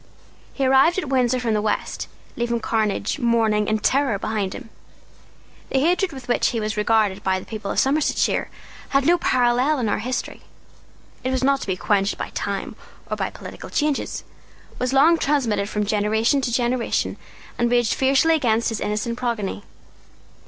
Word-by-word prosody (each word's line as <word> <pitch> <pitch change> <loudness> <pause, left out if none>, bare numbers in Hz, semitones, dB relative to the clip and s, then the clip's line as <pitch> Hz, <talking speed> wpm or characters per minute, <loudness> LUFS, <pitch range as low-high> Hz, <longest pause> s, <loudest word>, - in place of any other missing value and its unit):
He 275 - 0
arrived 270 +7 +4
at 355 -8 -2
Windsor 255 -1 +2
from 235 -3 0
the 210 - +1
West, 210 0 -2 0.3
leaving 235 -2 -1
carnage, 220 +2 -1
mourning, 225 -4 +2
and 215 0 -1
terror 270 -6 +2
behind 200 -2 -2
him. 225 - -10 1.0
The - - 0
hatred 355 +5 +2
with 265 -3 -10
which 245 - +2
he 230 - -1
was 215 0 -2
regarded 210 -2 +1
by 190 0 +1
the - - -11
people 215 -3 -6
of - - -3
Somersetshire 285 +3 +1 0.4
has 275 0 +2
no 345 +2 +4
parallel 255 +3 +2
in 240 -4 -1
our 205 - 0
history. 250 +4 -4 0.8
It 255 - -1
was 260 0 -1
not 275 0 +2
to - - -6
be 185 -1 -1
quenched 200 +1 +1
by - - -4
time - - -4 0.4
or - - +1
by - - -2
political - - -10
changes, 295 -2 -1 0.6
was 250 0 0
long 310 +5 +5
transmitted 235 -8 0
from 210 -1 -1
generation 220 +6 +1
to 255 -2 -1
generation, 240 0 0 0.4
and 240 0 +2
raged 240 -2 +2
fiercely 275 +5 +3
against 235 -7 +2
his 225 -2 -3
innocent 215 +3 -2
progeny. 215 -5 -3
240 Hz, 170 wpm, -22 LUFS, 215-270 Hz, 1.0 s, long